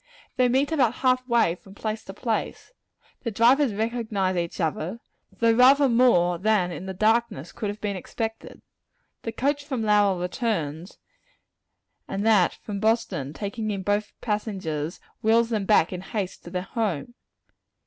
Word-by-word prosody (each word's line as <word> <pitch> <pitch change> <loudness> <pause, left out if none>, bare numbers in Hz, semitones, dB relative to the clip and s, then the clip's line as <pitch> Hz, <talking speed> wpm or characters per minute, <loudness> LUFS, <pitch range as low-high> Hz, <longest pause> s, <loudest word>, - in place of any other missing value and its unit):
They 255 -1 +3
meet 270 +4 +2
about 255 -7 +2
half 255 0 +3
way 235 -8 +3
from 195 +2 -15
place 215 +1 -4
to 195 - -8
place, 225 - -3 0.3
and - - -34
the 230 - -1
drivers 240 +5 +4
recognize 220 -4 -1
each 170 -1 -3
other 165 +5 -2 0.3
though 230 -1 +2
rather 270 +4 +6
more 205 -9 +3
than, 200 -3 +2
in 185 +2 -7
the 190 - -4
darkness, 215 - +1
could 210 -3 -4
have 205 +1 -6
been 205 -1 -2
expected. 225 +4 -6 0.6
The 225 - -4
coach 285 +5 -1
from 265 -6 -3
Lowell 205 -3 +3
returns, 180 - -3 1.1
and 195 +2 -3
that 210 -5 +4
from 205 -2 -4
Boston, 220 - 0
taking 215 +5 -4
in 195 -2 -3
both 205 +2 -1
passengers, 190 -8 -3 0.2
wheels 230 +1 +3
them 215 -4 -1
back 190 -4 +3
in 180 - -5
haste 195 -1 -4
to - - -7
their 180 0 -3
home. 215 -1 -3
215 Hz, 160 wpm, -25 LUFS, 185-235 Hz, 1.1 s, rather